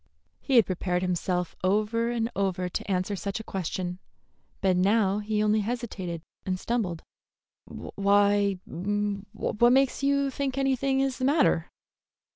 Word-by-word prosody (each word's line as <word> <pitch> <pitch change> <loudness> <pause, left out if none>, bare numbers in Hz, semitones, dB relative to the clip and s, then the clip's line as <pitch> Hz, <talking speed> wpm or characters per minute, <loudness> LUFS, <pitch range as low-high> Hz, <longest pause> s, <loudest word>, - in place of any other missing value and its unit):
He 270 - -1
had 230 - +7
prepared 180 -1 -1
himself 180 -1 -1
over 215 +4 +1
and 235 0 -1
over 185 -2 0
to 180 - -5
answer 185 +1 0
such 200 +2 -4
a - - -7
question, 180 -2 -4 0.6
but 190 -1 +2
now 200 +2 +3
he 210 0 0
only 215 +1 +3
hesitated 205 -7 -4 0.2
and 185 -1 -2
stumbled. 195 -9 -2 0.6
"Why 200 0 +2
what 205 +4 0
makes 270 0 +2
you 280 0 +2
think 275 0 -3
anything 270 0 +1
is 270 -1 -1
the 255 - 0
matter?" 285 +4 +3
205 Hz, 135 wpm, -27 LUFS, 185-240 Hz, 0.6 s, had